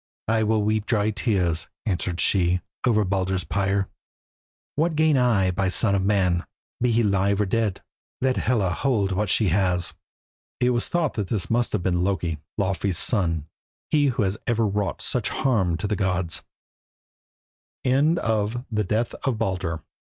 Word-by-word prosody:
"I 115 0 +2
will 110 0 +2
weep 110 0 0
dry 110 -2 +1
tears," 95 - 0 0.2
answered 90 -4 -1
she, 90 -2 +2 0.3
"over 110 -3 +3
Baldur's 95 -1 0
pyre. 95 +2 0 0.9
What 160 +2 +1
gain 155 -1 +3
I 115 -8 +3
by 95 +2 -1
the - - +2
son 100 +2 +3
of 100 - +2
man, 95 -4 +2 0.4
be 125 0 +3
he 115 +1 +3
live 100 0 +2
or 105 - +2
dead? 105 -1 -1 0.4
Let 130 0 +1
Hela 105 -7 +1
hold 105 -1 0
what 100 +1 0
she 105 -1 +2
has." 90 -1 +2 0.7
It 125 0 +3
was 120 -1 0
thought 170 -4 0
that 105 -4 -2
this 90 -4 -2
must 120 +1 +1
have 100 -5 0
been 90 -1 +1
Loki, 90 -5 -1 0.2
Laufey's 95 -2 0
son, 85 - +1 0.5
he 145 -2 +4
who 125 -4 +1
has 95 +2 -1
ever 115 -1 +2
wrought 100 -1 -1
such 120 -4 0
harm 95 -11 +1
to 105 - -4
the 105 0 0
gods. 95 -4 -1 1.4
THE 125 - +1
PUNISHMENT 115 - 0
OF 125 -5 -1
LOKI. 85 -4 -2
100 Hz, 160 wpm, -24 LUFS, 95-115 Hz, 1.4 s, he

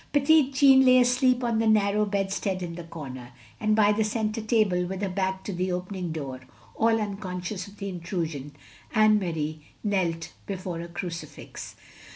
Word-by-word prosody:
Petit 290 0 +5
Jean 270 -1 +6
lay 255 -1 +6
aslecfp 250 0 +3
on 230 -2 +1
the 225 - +2
narrow 210 -1 +3
bedstead 195 -1 -1
in 170 -1 -5
the 170 0 -8
comer; 130 -7 -8 0.3
and 215 0 +2
by 210 -1 +5
the 215 +1 +1
centre 215 +1 -1
table, 215 -5 +2
with 190 +1 -4
her 195 - 0
back 190 0 -2
to 200 - -4
the 180 +1 -1
opening 180 -1 -3
door, 140 -5 -5 0.3
all 225 0 +2
tinconscious 195 -2 -4
of 200 +1 -15
in 190 -3 -4
trusion, 165 -5 -4 0.4
Anne 215 -1 +5
Marie 155 -4 -3 0.2
knelt 175 -6 -1
before 185 -3 -4
a 170 - -6
crucifix. 170 -3 -7
195 Hz, 170 wpm, -26 LUFS, 175-215 Hz, 0.4 s, Jean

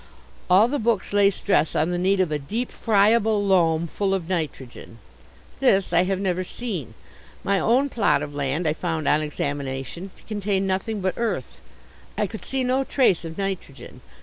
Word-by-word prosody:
All 190 +5 +6
the 285 +3 -2
books 220 -4 0
lay 200 -1 +5
stress 195 -4 0
on 160 +3 +1
the 175 - -1
need 190 +2 +2
of 180 -4 +1
"a 150 - -1
deep, 220 - -4
friable 215 0 +2
loam 170 -4 +3
full 195 +3 -1
of 175 -4 -4
nitrogen." 140 -9 -5 0.6
This 195 -9 +2
I 175 +2 +4
have 190 0 -1
never 185 -2 -1
seen. 185 - -6 0.5
My 200 -1 +1
own 255 +8 +3
plot 210 - +1
of 145 -1 -7
land 145 +4 -1
I 150 - +2
found 160 -2 -3
on 150 - +3
examination 145 +3 -4
to - - -19
contain 205 -2 -1
nothing 195 +3 -2
but 185 0 0
earth. 235 -1 -3 0.6
I - - +1
could - - -8
see 265 -1 -2
no 255 +2 +1
trace 245 - +2
of 165 -1 -7
nitrogen. 190 -8 -5
190 Hz, 175 wpm, -24 LUFS, 160-210 Hz, 0.6 s, All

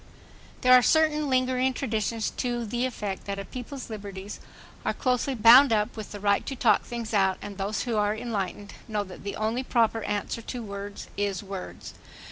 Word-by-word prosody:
There 255 0 +6
are 250 - +9
certain 305 +2 +3
lingering 255 0 +2
traditions 225 -3 -1
to 240 -1 -2
the 240 +4 -1
effect 205 -6 -5
that 200 0 -3
a 195 - -5
people's 255 +3 -7
liberties 200 -1 -7 0.4
are - - -1
closely 255 +1 0
bound 240 +4 +8
up 215 +1 +1
with 215 -2 -7
the 205 - -7
right 200 0 +2
to 270 - -3
talk 240 -3 +4
things 235 -2 -6
out 190 -2 +3
and 205 -1 -8
those 200 +2 -1
who 235 -3 -1
are 210 0 +2
enlightened 205 -3 -4
know 210 -2 -1
that 185 -2 -11
the 200 -1 -4
only 220 +4 -1
proper 230 -3 +1
answer 205 +2 -2
to 240 +1 -6
words 200 -1 -7
is 200 -1 -1
words. 195 -2 -7
220 Hz, 185 wpm, -27 LUFS, 205-250 Hz, 0.4 s, are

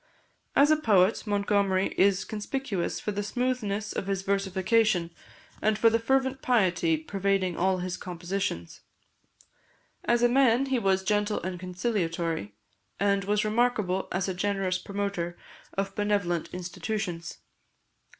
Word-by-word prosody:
As 290 +2 +6
a 310 - +5
poet, 215 -6 +3
Montgomery 200 -2 +1
is 195 -1 +3
conspicuous 215 -3 -3
for 210 - -3
the 205 0 -2
smoothness 215 -2 -2
of 195 - -3
his 195 -1 -1
versification, 195 -1 +1 0.5
and 215 0 +2
for 230 0 +5
the 230 - +2
fervent 265 +2 +1
piety 180 -9 +2
pervading 195 +2 -1
all 185 +2 +1
his 185 +1 -3
compositions. 175 - -4 1.2
As 240 0 +2
a - - +7
man, 255 0 +4
he 265 -2 0
was 190 -3 +1
gentle 210 +1 +1
and 180 0 -4
conciliatory, 170 - -2 0.4
and 200 -1 +2
was 210 +1 +1
remarkable 215 -4 +1
as 185 +1 -1
a 190 - -1
generous 190 -1 -1
promoter 200 -4 -3 0.4
of 195 0 -1
benevolent 200 -5 0
institutions. 180 -1 -4
200 Hz, 130 wpm, -28 LUFS, 185-215 Hz, 1.2 s, a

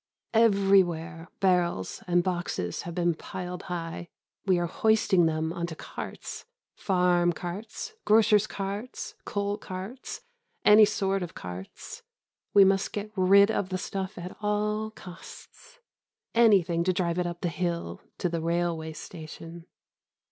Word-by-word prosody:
Everywhere 195 -7 +3
barrels 175 - +1
and 175 0 +3
boxes 175 - -2
have 170 -1 -7
been 175 -1 +2
piled 180 +2 -6
high. 170 -1 -5 0.4
We 185 -2 +4
are 175 - 0
hoisting 215 -4 +3
them 160 +1 -1
on 170 -1 -3
to 160 - -7
carts - - -7 0.3
farm 180 -2 +2
carts, 200 - -6
grocers' 215 -1 +5
carts, 200 +5 -5
coal 205 +1 -2
carts, 195 +8 -7 0.4
any 210 +1 +9
sort 195 -1 0
of 175 -2 -6
carts. 90 +1 -8 0.5
We 200 - +8
must 195 0 +2
get 210 0 -4
rid 200 +2 +6
of 195 -3 -1
the 185 - -1
stuff 190 +1 -4
at 180 +1 -7
all 210 +1 0
costs. 190 - -13 0.6
Anything 190 -8 +4
to 185 - +3
get 175 -1 0
it 175 - 0
up 175 0 -6
the 175 - 0
hill 170 - -3 0.2
to - - 0
the 170 -1 -2
railway 165 -1 -1
station. 165 +2 -9
180 Hz, 135 wpm, -28 LUFS, 170-200 Hz, 0.6 s, any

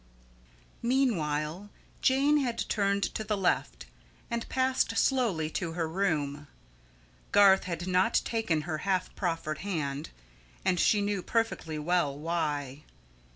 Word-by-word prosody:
Meanwhile 185 - 0 0.3
Jane 275 +3 +4
had 245 -5 -1
turned 200 -1 +1
to 220 - -3
the 215 -1 -1
left 185 -2 0 0.5
and 235 0 -3
passed 260 -3 +1
slowly 225 -13 +2
to 165 -1 -3
her 165 -1 -1
room. 150 -5 -1 0.8
Garth 200 -1 +6
had 175 -1 -4
not 185 +5 +3
taken 220 -9 0
her 155 -1 -4
half 185 +1 -1
proffered 165 -4 -2
hand, 155 -7 -3 0.6
and 180 -1 +2
she 205 +3 +4
knew 200 -1 -1
perfectly 225 -8 -1
well 150 -2 0
why. 150 -3 -2
180 Hz, 120 wpm, -29 LUFS, 155-220 Hz, 0.8 s, Garth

